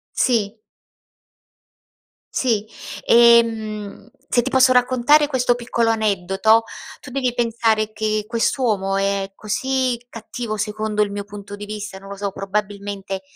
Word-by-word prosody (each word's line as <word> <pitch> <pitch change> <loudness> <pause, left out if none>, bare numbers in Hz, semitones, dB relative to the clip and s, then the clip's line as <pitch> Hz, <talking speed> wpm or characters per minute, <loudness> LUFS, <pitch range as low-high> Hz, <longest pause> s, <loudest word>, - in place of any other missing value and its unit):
Sì. 220 -4 +1 1.8
Sì, 225 -5 +1 0.4
ehm, 225 -3 +3 0.2
se 240 - +2
ti 265 - -3
posso 260 -1 +5
raccontare 255 +4 +4
questo 250 -4 +1
piccolo 235 -1 0
aneddoto, 215 0 +2 0.4
tu - - -11
devi 255 -2 -1
pensare 225 -2 +1
che 215 -1 -1
quest'uomo, 225 -4 0
è 195 0 -1
così 255 +4 -1
cattivo, 230 -1 -6
secondo 210 0 -1
il 205 - -1
mio 200 0 -5
punto 205 0 -9
di 205 0 -8
vista, 210 -2 -6
non 195 - -13
lo 200 - -6
so, 200 0 -3
probabilmente 195 -1 -4
215 Hz, 125 wpm, -21 LUFS, 205-240 Hz, 1.8 s, posso